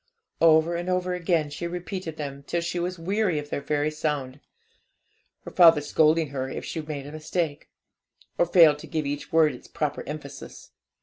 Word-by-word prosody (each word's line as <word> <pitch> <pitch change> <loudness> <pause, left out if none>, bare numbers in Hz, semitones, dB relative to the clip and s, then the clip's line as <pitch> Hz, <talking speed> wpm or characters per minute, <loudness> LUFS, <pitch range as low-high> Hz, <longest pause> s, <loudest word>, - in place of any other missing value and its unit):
Over 165 +1 +5
and 175 +1 -3
over 180 0 0
again 165 -4 0
she 170 +4 -4
repeated 175 -1 -5
them, 140 -2 -6
till 170 - -1
she 170 +1 -3
was 180 +1 -3
weary 190 0 0
of 145 0 -5
their - - -2
very 145 +1 0
sound, 145 -3 -3 1.0
her - - -8
father 165 -4 +7
scolding 155 +1 +2
her 135 -1 -4
if - - -6
she 160 - -4
made 150 -3 -6
a 145 - -8
mistake, 155 0 -3 0.7
or 175 - +4
failed 160 -4 +6
to - - -10
give 155 -2 -2
each 145 +1 -4
word 160 -3 +4
its 125 - -12
proper 150 -2 -3
emphasis. 145 -2 -9
155 Hz, 180 wpm, -26 LUFS, 145-170 Hz, 1.0 s, father